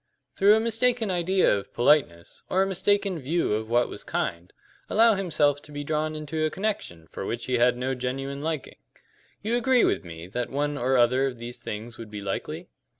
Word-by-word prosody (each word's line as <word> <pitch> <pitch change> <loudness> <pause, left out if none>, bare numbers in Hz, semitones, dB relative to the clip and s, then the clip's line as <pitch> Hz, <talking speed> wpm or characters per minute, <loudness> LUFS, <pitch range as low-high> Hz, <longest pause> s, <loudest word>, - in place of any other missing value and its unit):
"Through 205 +2 +6
a - - +3
mistaken 230 -1 +1
idea 180 - +3
of 100 - -7
politeness, 120 - +2
or 190 +1 +3
a - - -1
mistaken 195 -1 +1
view 155 -2 0
of 110 +1 -2
what 120 +1 +3
was - - -8
kind, 85 +1 -3 0.4
allow 225 +1 +5
himself 150 -7 +1
to 150 - -15
be 145 0 -5
drawn 155 +1 -1
into 155 +1 -3
a 155 - +2
connection 170 - -4
for - - -6
which 120 +4 -3
he 125 -2 0
had 120 0 +4
no 130 +2 -1
genuine 135 +2 -4
liking. 155 -2 -4 0.7
You 225 +3 0
agree 245 +1 +3
with - - +1
me 85 -1 -9
that 120 +6 -4
one 145 +1 -1
or 130 0 +1
other 125 +3 +3
of 125 -2 -5
these 120 +1 -8
things 110 +3 -7
would 115 -2 -8
be 105 -1 -6
likely?" 100 -1 -4
145 Hz, 200 wpm, -26 LUFS, 120-185 Hz, 0.7 s, Through